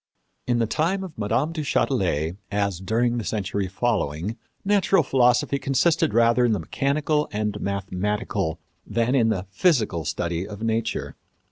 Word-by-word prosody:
In 120 -1 +2
the 115 - +2
time 170 - 0
of 180 -4 -8
Mme. 115 +9 0
du 165 -2 -3
Châtelet, 90 - 0 0.2
as 100 -3 0
during 120 +5 0
the - - -4
century 100 -2 -2
following, 95 -3 -1 0.3
natural 195 -3 +3
philosophy 130 +1 +2
consisted 160 +5 +2
rather 120 +1 +4
in 120 -2 +3
the 105 - 0
mechanical 145 - 0
and 105 -1 -2
mathematical 100 -2 -2 0.2
than 115 +3 0
in 120 -5 +3
the 95 -4 -1
physical 110 - +2
study 85 +3 -2
of 105 +1 -8
nature. 115 0 -2
115 Hz, 145 wpm, -24 LUFS, 100-135 Hz, 0.3 s, rather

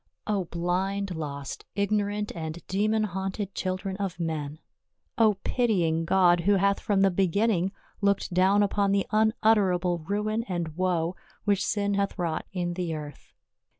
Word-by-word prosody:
O 200 -4 0
blind, 185 +3 -1
lost, 140 -3 -5
ignorant 205 0 0
and 160 0 -6
demon 215 +3 +1
haunted 195 0 -3
children 190 +1 -3
of 190 -3 -3
men! 155 -3 -3 0.6
O 215 -2 +5
pitying 175 -10 +1
God, 175 0 +4
who 195 +4 +3
hath 200 +1 +2
from 200 -2 +1
the 195 -1 +4
begin 195 +5 +2
ning 185 -1 0 0.3
looked 200 -2 +1
down 190 +3 +4
upon 200 0 +1
the 200 -1 +2
unutterable 210 -5 +2
ruin 210 +6 -1
and 170 -6 -3
woe 180 -1 0 0.3
which 200 -2 +2
sin 205 -1 0
hath 200 0 -1
wrought 165 -3 -2
in 175 -2 -2
the 175 -2 -2
earth 150 -1 -9
190 Hz, 150 wpm, -27 LUFS, 175-205 Hz, 0.6 s, O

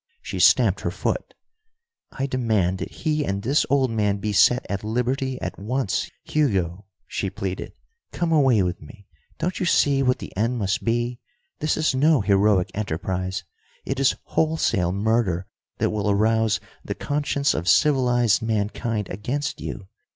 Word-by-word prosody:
She - - -5
stamped - - +5
her - - -1
foot. - - -3 0.8
"I 135 - -3
demand 110 -9 0
that - - -4
he 155 -2 -1
and 100 -5 -2
this 140 +6 +2
old 135 -3 +2
man 105 -2 +1
be 105 +1 -3
set 125 +6 +4
at 100 0 -3
liberty 125 +4 -1
at - - -5
once. 105 -1 -1
Hugo," 100 - 0 0.2
she 95 - -3
pleaded, 95 -1 -5 0.4
"come 170 -2 -1
away 135 -10 +4
with 90 -1 -3
me. 100 +7 -14 0.3
Don't 180 +2 -2
you 185 - 0
see 140 -4 +3
what 125 -1 +2
the - - -9
end 115 +5 0
must 100 -3 -1
be? 120 +1 -1 0.4
This 155 - 0
is 155 -2 +1
no 145 0 +4
heroic 100 -1 +3
enterprise, 95 0 -3 0.4
it 135 0 -2
is 135 -1 +3
wholesale 115 - +1
murder 100 -3 0 0.3
that - - 0
will 105 -1 -1
arouse 110 +1 +2 0.2
the - - -4
conscience 145 -1 0
of 85 +4 -1
civilized 125 -7 +3
mankind 110 -1 -1
against 135 +10 -3
you! 100 -2 -6
110 Hz, 155 wpm, -23 LUFS, 100-135 Hz, 0.8 s, stamped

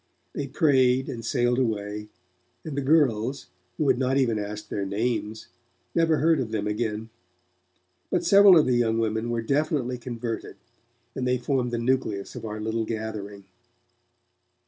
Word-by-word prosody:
They 140 - -3
prayed 130 -2 +3
and 115 -2 -6
sailed 120 +1 +1
away, 105 -3 -2 0.6
and 155 -3 -5
the 140 - -1
girls, 135 -4 +1 0.3
who 150 - 0
had 130 - +3
not 130 +1 +1
even 120 -5 +1
asked 105 +1 -6
their 100 - -2
names, 110 +2 -2 0.5
never 165 -2 +3
heard 160 -1 +3
of 125 -4 -2
them 110 -2 -2
again. 110 +1 -3 1.0
But - - 0
several 200 -2 +8
of 155 - +5
the 125 -1 +2
young 115 -2 +1
women 110 +1 -1
were 115 -1 -1
definitely 140 -2 0
converted, 120 -2 -5 0.6
and 125 - -2
they 125 0 +2
formed 125 0 -1
the 120 - -2
nucleus 115 -5 -1
of 120 -3 -7
our 105 0 -5
little 110 +1 -1
gathering. 110 -3 -5
120 Hz, 155 wpm, -26 LUFS, 110-130 Hz, 1.0 s, several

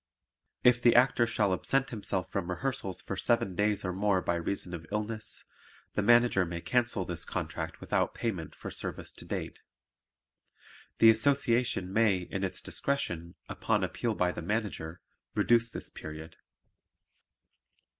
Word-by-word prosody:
If 125 0 +5
the 120 -1 +5
Actor 120 -1 +5
shall 100 -4 +1
absent 135 +8 0
himself 100 -4 -2
from 95 -3 -2
rehearsals 110 -1 -2
for 100 - -4
seven 100 -1 +1
days 105 +2 +1
or 90 - -1
more 100 0 +2
by 85 - -1
reason 90 +1 -2
of 80 -2 -7
illness, 110 +1 -4 0.5
the - - +1
Manager 120 -2 +5
may 85 -1 -4
cancel 115 -2 0
this 85 -1 -2
contract - - -4
without - - 0
payment 95 -9 -3
for - - -7
service - - -5
to - - -9
date. - - -5 1.4
The 115 0 +8
Association 115 -5 +1
may, 110 -3 +4
in 95 +2 -4
its 95 -1 -2
discretion, 85 -12 -2
upon - - 0
appeal 115 -2 -1
by 90 0 +2
the - - -6
Manager, 90 -4 -3 0.3
reduce 115 -1 +3
this - - -8
period. 80 +1 -9
100 Hz, 145 wpm, -30 LUFS, 90-115 Hz, 1.4 s, The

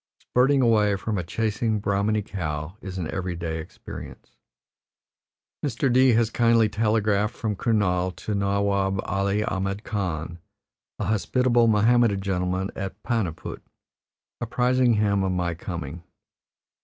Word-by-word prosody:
Spurting 135 +2 +2
away 105 -3 +4
from 100 +1 -2
a - - -2
chasing 110 +4 -1
Brahmani 100 +1 0
cow 80 -4 -4
is 95 -1 -6
an 85 -4 -2
every 90 -2 -3
day 80 -1 -3
experience. 80 - -10 1.3
Mr. 130 -2 0
D 130 0 +5
has 115 0 +2
kindly 115 -1 +4
telegraphed 105 -1 +1
from 110 -2 -2
Kurnaul 95 -5 +1
to 105 - -4
Nawab 100 -1 +1
Ali 100 +2 0
Ahmed 95 +1 -2
Khan, 85 -5 -3 0.6
a - - -3
hospitable 120 +2 +2
Mohammedan 110 -1 +4
gentleman 95 0 -1
at 95 +1 -6
Paniput, 105 -9 -3 0.8
apprising 125 +1 +2
him 100 -2 +2
of 95 -1 0
my 90 -1 -1
coming. 85 -2 -6
100 Hz, 125 wpm, -25 LUFS, 95-115 Hz, 1.3 s, D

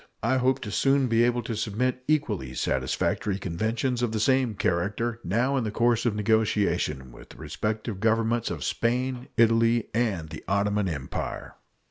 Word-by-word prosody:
I 130 +3 +2
hope 130 0 +1
soon 135 +6 +2
to - - +1
be 115 0 +3
able 120 0 +1
to 115 0 -4
submit 125 +5 -1
equally 105 - 0
satisfactory 65 +11 -1
conventions 110 +8 -2
of 120 -2 0
the 110 - 0
same 130 0 +2
character 105 +7 -1
now 125 +9 +1
in 130 - 0
the 110 - -2
course 115 +2 +2
of 110 - 0
negotiation 100 - 0
with - - -14
the - - -14
respective 110 -1 -3
Governments 115 +1 +1
of - - -4
Spain, 125 +1 -1
Italy, 115 0 +3
and 100 -9 -1
the - - -8
Ottoman 100 0 +1
Empire. 70 -4 -5
115 Hz, 160 wpm, -26 LUFS, 100-120 Hz, -, be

